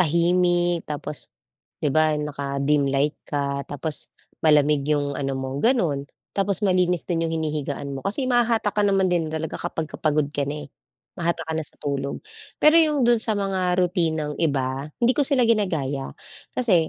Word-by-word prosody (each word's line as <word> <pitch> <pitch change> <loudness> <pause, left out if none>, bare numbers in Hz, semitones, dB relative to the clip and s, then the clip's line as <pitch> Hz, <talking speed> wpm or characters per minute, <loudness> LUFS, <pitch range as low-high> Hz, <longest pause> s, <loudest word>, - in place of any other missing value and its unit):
tahimik 175 +1 +2
tapos 150 0 -6 0.5
'di 145 -3 0
ba 155 -1 +3
naka 140 -2 -4
dim 145 -1 +3
light 140 +2 +1
ka, 140 -1 -1
tapos 150 +2 -4 0.3
malamig 150 -1 +4
'yung 145 -1 +1
ano 135 -1 -2
mo, 135 +1 -4
gano'n. 170 - +2 0.3
Tapos 200 +1 0
malinis 180 -2 +2
din 165 -2 0
'yung - - -4
hinihigaan 150 -3 -3
mo. 135 - -5
Kasi 210 - -1
mahahatak 235 -4 +2
ka 210 - +1
naman 195 -2 +3
din 165 -3 +1
talaga 160 0 -4
kapagka 160 -2 -4
pagod 150 -1 +2
ka 145 - -1
na, 150 +1 -4
eh, - - -22 0.5
mahatak 170 -1 -1
ka 160 - -3
na 160 - -1
sa - - -8
tulog. 140 -1 -3 0.4
Pero 305 +1 +6
'yung 300 -5 +2
dun 235 -1 +4
sa 220 -2 +2
mga 190 -3 0
rutinang 165 -5 0
iba, 135 -3 -1
hindi 240 +2 +5
ko 275 - -1
sila 265 -4 +4
ginagaya, 160 - 0 0.4
kasi, 180 -10 +3
160 Hz, 170 wpm, -24 LUFS, 145-190 Hz, 0.5 s, Pero